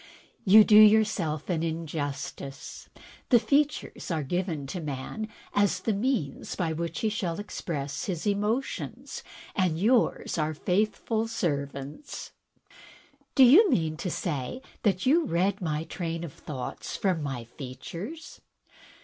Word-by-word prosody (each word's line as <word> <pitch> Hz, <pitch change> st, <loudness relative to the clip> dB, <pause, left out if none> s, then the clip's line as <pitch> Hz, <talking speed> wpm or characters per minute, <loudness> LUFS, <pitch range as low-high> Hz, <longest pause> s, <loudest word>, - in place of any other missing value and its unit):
"You 215 Hz, +2 st, +9 dB
do 210 Hz, 0 st, +6 dB
yourself 210 Hz, -8 st, +4 dB
an 170 Hz, -4 st, 0 dB
injustice. 145 Hz, -4 st, -5 dB, 0.4 s
The 245 Hz, -, +7 dB
features 290 Hz, +5 st, 0 dB
are 160 Hz, -4 st, 0 dB
given 170 Hz, -1 st, -2 dB
to 175 Hz, +6 st, -5 dB
man 150 Hz, +9 st, -4 dB, 0.3 s
as 200 Hz, -3 st, +2 dB
the 220 Hz, -, 0 dB
means 205 Hz, -, -1 dB
by 165 Hz, -3 st, -1 dB
which 170 Hz, +1 st, -3 dB
he 220 Hz, -, +2 dB
shall 185 Hz, -5 st, -2 dB
express 150 Hz, -8 st, -4 dB
his 175 Hz, -2 st, -3 dB
emotions, 210 Hz, +6 st, -2 dB, 0.3 s
and 180 Hz, -5 st, +1 dB
yours 225 Hz, -4 st, +2 dB
are 155 Hz, 0 st, 0 dB
faithful 215 Hz, +6 st, 0 dB
servants." 140 Hz, -, -4 dB, 0.6 s
" 280 Hz, -1 st, -25 dB
Do 270 Hz, -, +8 dB
you 340 Hz, -, +8 dB
mean 160 Hz, -, +1 dB
to 180 Hz, -, -3 dB
say 165 Hz, -, -3 dB, 0.2 s
that 190 Hz, -4 st, +1 dB
you 315 Hz, +5 st, +4 dB
read 190 Hz, -1 st, +1 dB
my 155 Hz, -2 st, -1 dB
train 165 Hz, -1 st, -4 dB
of 160 Hz, -5 st, -6 dB
thoughts 135 Hz, -5 st, -6 dB
from 185 Hz, -5 st, +1 dB
my 135 Hz, -5 st, -3 dB
features?" 145 Hz, -, -8 dB
175 Hz, 130 wpm, -28 LUFS, 155-215 Hz, 0.6 s, You